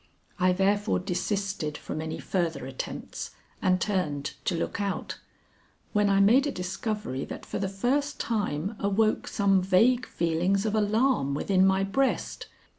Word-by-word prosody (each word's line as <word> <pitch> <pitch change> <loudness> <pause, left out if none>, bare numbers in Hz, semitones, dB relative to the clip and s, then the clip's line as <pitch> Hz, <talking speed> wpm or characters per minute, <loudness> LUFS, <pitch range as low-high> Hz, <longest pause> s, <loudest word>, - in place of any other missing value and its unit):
I 185 0 +4
therefore 195 - +2
desisted 180 - -2
from 155 - -5
any 160 0 -4
further 165 -7 -2
attempts 135 0 -6 0.3
and 185 0 +3
turned 155 -8 -1
to 180 - +1
look 170 - -2
out, 200 -1 -3 0.7
when 210 -1 +3
I 195 0 +4
made 240 +9 +5
a - - -1
discovery 185 - -3
that - - -8
for - - -4
the 195 - -1
first 275 +9 0
time 205 -3 -1
awoke 210 +2 +1
some 195 -2 +3
vague 230 +7 +3
feelings 175 +5 0
of 215 - 0
alarm 215 - +2
within 190 +5 +3
my 190 0 +3
breast. 265 +8 -1
195 Hz, 145 wpm, -27 LUFS, 175-210 Hz, 0.7 s, made